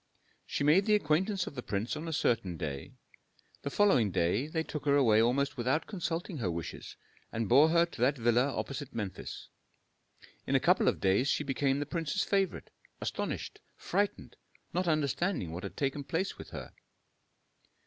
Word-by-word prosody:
She - - -2
made 165 +8 +4
the 210 - +5
acquaintance 190 +2 +1
of - - -7
the 125 - -5
prince 105 +3 -2
on 155 +2 -5
a - - -3
certain 100 - 0
day; 70 -3 -5 0.7
the - - -3
following 140 - +4
day 90 - +1
they 160 +1 -1
took 150 -2 -6
her 140 -1 +4
away 115 -6 +5
almost 130 +4 +1
without 130 +6 0
consulting 170 -3 -3
her 100 -6 -1
wishes, 85 -1 -6 0.4
and 115 -1 -2
bore 140 +8 +6
her 170 +1 +4
to 170 - -10
that 135 +3 +3
villa 120 +3 +2
opposite 140 0 -5
Memphis. 100 -5 -5 1.0
In - - +1
a - - +6
couple - - +3
of - - +2
days 95 +8 +3
she 150 - +1
became 135 0 0
the 145 - -2
prince's 165 +5 -1
favorite, 195 -3 -1 0.3
astonished, - - -4 0.2
frightened, 200 +3 -2 0.4
not 180 +1 0
understanding 155 - 0
what 85 +2 -5
had - - -7
taken 140 0 -1
place 170 +7 -2
with - - -10
her. - - -8
140 Hz, 170 wpm, -31 LUFS, 120-165 Hz, 1.0 s, bore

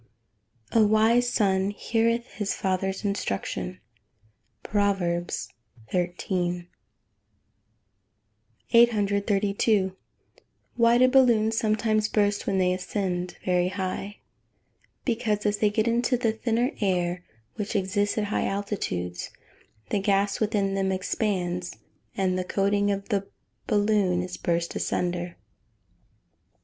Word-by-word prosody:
[Verse: 230 - +5
"A - - +4
wise 225 +3 +4
son 195 -4 +2
heareth 230 +3 0
his 205 -2 -2
father's 190 +1 -1
instruction." 100 - -3 0.8
PROVERBS 190 -4 0 0.4
XIII.] 175 0 -1 2.0
832. 205 -3 +3 0.8
Why 235 0 +5
do 255 +1 +6
balloons 235 -4 +4
sometimes 215 0 +1
burst 205 -1 +1
when 195 - +1
they 180 -1 +3
ascend 180 -1 -3
very 180 -1 +2
high? 190 +2 -4 0.9
Because, 225 -4 0
as 205 0 +1
they 210 - +3
get 220 +2 0
into 240 +2 +2
the 235 -2 +1
thinner 230 +3 0
air, 180 -2 0 0.3
which 210 +1 -4
exists 205 +2 0
at 215 - +1
high 205 - -1
altitudes, 135 - -3 0.6
the 205 - +2
gas 200 0 +1
within 205 -3 0
them 195 -1 0
expands, 180 -2 -2 0.4
and 185 -1 +1
the - - -1
coating 200 +2 +1
of 200 +1 -2
the 200 -3 0 0.4
balloon 205 -4 +2
is 180 0 -6
burst 170 0 -1
asunder. 175 0 -2
200 Hz, 110 wpm, -26 LUFS, 185-215 Hz, 2.0 s, do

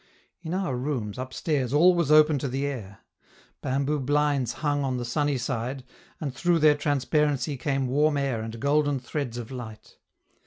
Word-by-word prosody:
In 170 +1 -4
our 185 -9 -1
rooms, 125 -5 -3
upstairs, 130 0 -2
all 175 +5 +6
was 170 -4 +1
open 155 -1 +6
to 140 - -2
the 135 +2 -2
air; 110 -9 -6 0.6
bamboo 140 +3 0
blinds 145 -1 +1
hung 145 -1 +1
on 130 -2 -1
the 120 - -3
sunny 145 +3 0
side, 125 +1 -3 0.4
and 140 -4 -4
through 175 +5 +2
their 155 -1 +6
transparency 145 0 0
came 135 0 -1
warm 145 +3 +2
air 135 -5 -1
and 115 +1 -6
golden 145 +1 +2
threads 125 -1 -4
of 120 +1 -7
light. 110 -4 -9
140 Hz, 165 wpm, -26 LUFS, 125-150 Hz, 0.6 s, all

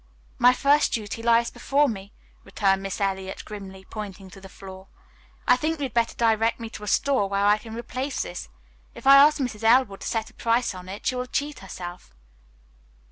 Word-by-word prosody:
"My 245 0 +7
first 285 +3 +3
duty 220 0 -3
lies 235 0 +3
before 285 +2 +1
me," 200 -4 -6 0.3
returned 195 -2 +1
Miss 195 +1 -5
Eliot 190 -1 -3
grimly, 190 -2 -9
pointing 195 -3 -8
to 195 - -13
the 195 - -11
floor. 190 0 -11 0.6
"I 250 - +7
think 310 +5 -1
you 290 - -4
had 260 -5 -4
better 235 -1 +1
direct 225 0 +2
me 225 -1 -7
to - - -9
a - - -7
store 260 -4 +1
where 200 0 +1
I 210 +1 +4
can 225 0 -9
replace 255 +4 -3
this. - - -7 0.5
If - - -12
I 275 +1 +9
ask 295 +2 +6
Mrs. 245 -6 -4
Elwood 225 -3 +4
to - - -5
set 225 -1 -2
a - - -29
price 235 0 0
on 185 0 -10
it, 200 +2 -8
she - - +1
will 250 0 -3
cheat 285 +2 -3
herself." 175 - -9
225 Hz, 200 wpm, -25 LUFS, 195-250 Hz, 0.6 s, I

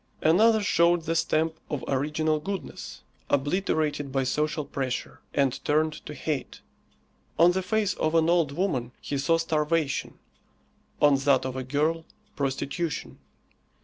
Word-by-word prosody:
Another 215 +7 +5
showed 170 -2 +3
the 165 +1 -1
stamp 160 0 +1
of 145 - -3
original 155 +3 0
goodness, 195 +4 -6 0.3
obliterated 145 -1 0
by 135 0 +1
social 150 +3 -1
pressure, 130 -3 -4
and 135 -2 0
turned 155 +1 0
to 150 - -7
hate. 145 -5 -4 0.8
On 170 +2 +6
the 190 +1 -1
face 205 +2 0
of 155 +1 -1
an 165 -1 +4
old 170 -4 +3
woman 140 -8 -1
he 140 - -3
saw 165 +4 +3
starvation; 160 -2 -1 0.8
on 145 -2 +5
that 135 -1 +2
of 130 -1 -3
a 130 - -2
girl, 150 +5 0 0.3
prostitution. 140 +3 -3
155 Hz, 135 wpm, -27 LUFS, 140-165 Hz, 0.8 s, On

